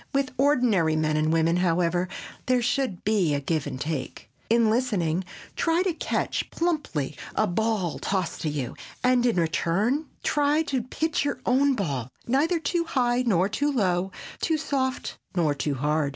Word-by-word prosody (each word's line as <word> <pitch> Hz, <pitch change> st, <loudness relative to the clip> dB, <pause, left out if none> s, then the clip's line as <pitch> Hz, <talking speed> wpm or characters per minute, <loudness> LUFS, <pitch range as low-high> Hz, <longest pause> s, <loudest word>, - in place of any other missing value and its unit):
With 275 Hz, -1 st, +1 dB
ordinary 240 Hz, -, +3 dB
men 155 Hz, -1 st, +1 dB
and 155 Hz, +1 st, +2 dB
women, 165 Hz, +1 st, +3 dB
however, 175 Hz, 0 st, +1 dB, 0.4 s
there 250 Hz, -1 st, +3 dB
should 245 Hz, -6 st, -1 dB
be 185 Hz, -9 st, +2 dB
give 155 Hz, 0 st, -1 dB
and 130 Hz, -, -5 dB
take. 150 Hz, -4 st, -4 dB, 0.2 s
In 230 Hz, 0 st, +4 dB
listening, 205 Hz, -8 st, +1 dB, 0.3 s
try 335 Hz, +2 st, +2 dB
to 375 Hz, -2 st, 0 dB
catch -, -, -2 dB
plumply 295 Hz, -, -1 dB, 0.2 s
a -, -, +3 dB
ball 205 Hz, -2 st, -1 dB
tossed 190 Hz, -4 st, -2 dB
to 155 Hz, -, -1 dB
you 140 Hz, -5 st, -3 dB, 0.3 s
and 250 Hz, -1 st, +4 dB
in 235 Hz, -, +2 dB
return 190 Hz, -, +1 dB, 0.2 s
try 295 Hz, +2 st, +2 dB
to 270 Hz, -5 st, -1 dB
pitch 310 Hz, +7 st, -1 dB
your 285 Hz, -1 st, -2 dB
own 270 Hz, +2 st, +3 dB
ball 140 Hz, -, -2 dB, 0.2 s
neither 295 Hz, +8 st, +2 dB
too 335 Hz, +2 st, 0 dB
high 250 Hz, -6 st, +1 dB
nor 190 Hz, -3 st, +3 dB
too 285 Hz, +8 st, 0 dB
low, 190 Hz, -6 st, +1 dB, 0.3 s
too 320 Hz, -1 st, +1 dB
soft 270 Hz, -4 st, -2 dB, 0.2 s
nor 160 Hz, -5 st, +2 dB
too 145 Hz, 0 st, -2 dB
hard. 150 Hz, +2 st, +1 dB
215 Hz, 160 wpm, -26 LUFS, 165-270 Hz, 0.4 s, In